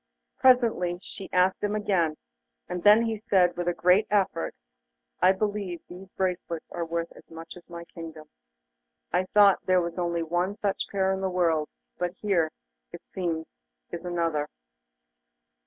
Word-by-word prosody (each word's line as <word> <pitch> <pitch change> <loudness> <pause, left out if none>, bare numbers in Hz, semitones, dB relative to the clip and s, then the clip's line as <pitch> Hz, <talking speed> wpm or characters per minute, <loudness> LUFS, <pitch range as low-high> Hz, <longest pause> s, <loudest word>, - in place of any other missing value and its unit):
Presently 235 -9 +4
she 195 - -9
asked 185 +1 +2
him 205 0 0
again, 175 -7 +1 0.5
and 180 0 -4
then 210 +4 +7
he 225 -1 -1
said, 190 -5 +3
with 175 0 -3
a 175 - +2
great 180 +5 +4
effort: 200 -2 0 0.7
'I 185 +1 +6
believe 200 -3 -3
these 185 +2 -11
bracelets 180 -3 -3
are 170 - -3
worth 170 0 -3
as - - -17
much 165 0 -10
as 180 0 -15
my 170 0 -8
kingdom. 160 -2 -10 0.9
I 180 +1 +2
thought 200 0 +5
there 185 0 +5
was 170 0 -3
only 170 -1 0
one 175 +4 -1
such 200 -2 -1
pair 190 -1 +1
in 190 - -3
the 190 - 0
world; 165 -4 +1 0.3
but 180 0 -2
here, 185 -7 +1 0.4
it - - -10
seems, 165 -3 -3 0.4
is 170 0 -6
another. 165 -4 -1
180 Hz, 155 wpm, -27 LUFS, 170-195 Hz, 0.9 s, then